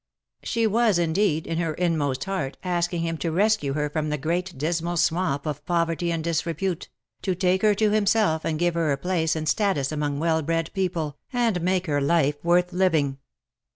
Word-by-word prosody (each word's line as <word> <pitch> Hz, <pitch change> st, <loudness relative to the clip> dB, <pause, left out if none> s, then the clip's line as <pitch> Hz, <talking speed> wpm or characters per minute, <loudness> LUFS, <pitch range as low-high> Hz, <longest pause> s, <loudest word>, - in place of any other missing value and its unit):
She 230 Hz, -1 st, 0 dB
was, 220 Hz, -2 st, +3 dB
indeed, 165 Hz, -1 st, +1 dB
in 165 Hz, 0 st, -2 dB
her 165 Hz, -3 st, -1 dB
inmost 150 Hz, -7 st, 0 dB
heart, 145 Hz, -9 st, -3 dB
asking 175 Hz, -1 st, -1 dB
him 165 Hz, -1 st, -2 dB
to 165 Hz, -, -1 dB
rescue 200 Hz, -5 st, +2 dB
her 150 Hz, 0 st, 0 dB
from 155 Hz, +1 st, -2 dB
the 150 Hz, -, -1 dB
great 170 Hz, +4 st, -2 dB
dismal 170 Hz, +4 st, -1 dB
swamp 160 Hz, -4 st, +1 dB
of 150 Hz, -3 st, -4 dB
poverty 170 Hz, 0 st, 0 dB
and 165 Hz, -1 st, -2 dB
disrepute: 170 Hz, +2 st, -2 dB, 0.3 s
to 190 Hz, -2 st, -1 dB
take 185 Hz, +1 st, +1 dB
her 210 Hz, -1 st, +4 dB
to 215 Hz, +1 st, +2 dB
himself, 210 Hz, -6 st, +2 dB
and 155 Hz, -, -1 dB
give 175 Hz, +1 st, +1 dB
her 165 Hz, -3 st, +1 dB
a 140 Hz, -, +1 dB
place 165 Hz, 0 st, 0 dB
and 155 Hz, -1 st, -3 dB
status 175 Hz, -7 st, +1 dB
among 145 Hz, -2 st, -2 dB
well 160 Hz, +1 st, +1 dB
bred 165 Hz, +1 st, -1 dB
people, 170 Hz, -6 st, -2 dB
and 235 Hz, -8 st, +1 dB
make 185 Hz, +1 st, +1 dB
her 145 Hz, -3 st, 0 dB
life 145 Hz, -1 st, +1 dB
worth 175 Hz, +1 st, +2 dB
living. 160 Hz, -7 st, +1 dB
170 Hz, 190 wpm, -25 LUFS, 155-185 Hz, 0.3 s, her